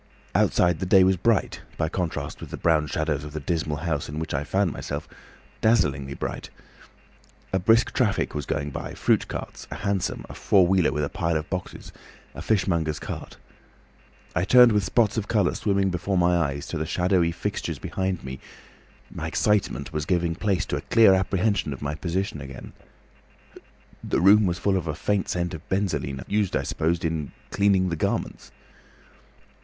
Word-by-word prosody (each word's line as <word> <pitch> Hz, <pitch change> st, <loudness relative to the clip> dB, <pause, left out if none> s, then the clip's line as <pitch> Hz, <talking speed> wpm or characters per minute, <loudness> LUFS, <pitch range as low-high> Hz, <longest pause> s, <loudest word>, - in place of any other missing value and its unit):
Outside 85 Hz, -3 st, +3 dB
the 95 Hz, -, -2 dB
day 95 Hz, 0 st, +6 dB
was 95 Hz, +1 st, +4 dB
bright—by 95 Hz, -5 st, -1 dB
contrast 90 Hz, -2 st, -3 dB
with -, -, -8 dB
the -, -, -6 dB
brown 80 Hz, -2 st, +2 dB
shadows 75 Hz, -1 st, -1 dB
of 75 Hz, -1 st, -8 dB
the 75 Hz, -, -3 dB
dismal 80 Hz, -1 st, -2 dB
house 75 Hz, -3 st, -2 dB
in 75 Hz, -, -6 dB
which 80 Hz, +1 st, -4 dB
I 70 Hz, 0 st, 0 dB
found 95 Hz, +3 st, +1 dB
myself, -, -, -5 dB, 0.5 s
dazzlingly 70 Hz, -, +2 dB
bright. -, -, -5 dB, 1.0 s
A 95 Hz, -, +2 dB
brisk 115 Hz, +5 st, +3 dB
traffic 110 Hz, -6 st, +1 dB
was 75 Hz, -2 st, -4 dB
going 75 Hz, -1 st, -2 dB
by, -, -, -6 dB
fruit -, -, +2 dB
carts, -, -, -7 dB
a -, -, -6 dB
hansom, 100 Hz, -2 st, -2 dB
a -, -, -9 dB
four 95 Hz, -3 st, +3 dB
wheeler 90 Hz, -5 st, +3 dB
with 75 Hz, +2 st, -1 dB
a 70 Hz, -, -1 dB
pile 85 Hz, -3 st, -1 dB
of 75 Hz, -, -5 dB
boxes, 90 Hz, -1 st, -5 dB, 0.4 s
a -, -, -8 dB
fishmonger's 85 Hz, -7 st, 0 dB
cart. -, -, -7 dB, 1.0 s
I 90 Hz, -, +2 dB
turned 125 Hz, +4 st, +7 dB
with 105 Hz, -2 st, +2 dB
spots 110 Hz, +3 st, +1 dB
of 105 Hz, -, -2 dB
colour 105 Hz, -5 st, +2 dB
swimming 100 Hz, -2 st, +1 dB
before 90 Hz, +2 st, -1 dB
my 90 Hz, 0 st, +3 dB
eyes 70 Hz, -4 st, -1 dB
to -, -, -3 dB
the 80 Hz, -, -2 dB
shadowy 90 Hz, -1 st, +2 dB
fixtures -, -, -3 dB
behind 95 Hz, -2 st, -3 dB
me. 65 Hz, 0 st, -6 dB, 0.7 s
My -, -, -4 dB
excitement 105 Hz, -2 st, 0 dB
was 75 Hz, -1 st, -2 dB
giving 85 Hz, -2 st, +1 dB
place 95 Hz, +2 st, 0 dB
to -, -, -2 dB
a -, -, -4 dB
clear 115 Hz, -4 st, +5 dB
apprehension 95 Hz, -3 st, +1 dB
of 70 Hz, -, -10 dB
my 70 Hz, +1 st, -2 dB
position 85 Hz, 0 st, -3 dB
again. 65 Hz, -2 st, -9 dB, 1.3 s
The -, -, 0 dB
room 100 Hz, +3 st, +6 dB
was 85 Hz, -1 st, -1 dB
full 95 Hz, +1 st, +1 dB
of 90 Hz, -, -4 dB
a 75 Hz, -, -2 dB
faint 100 Hz, +5 st, -1 dB
scent 90 Hz, 0 st, -1 dB
of -, -, -6 dB
benzoline, 95 Hz, -9 st, -1 dB
used, 105 Hz, -2 st, 0 dB
I -, -, 0 dB
suppose, 85 Hz, +2 st, 0 dB
in 80 Hz, -3 st, -2 dB, 0.2 s
cleaning 95 Hz, -2 st, +3 dB
the 85 Hz, -, -1 dB
garments. -, -, -3 dB
90 Hz, 180 wpm, -25 LUFS, 75-95 Hz, 1.3 s, turned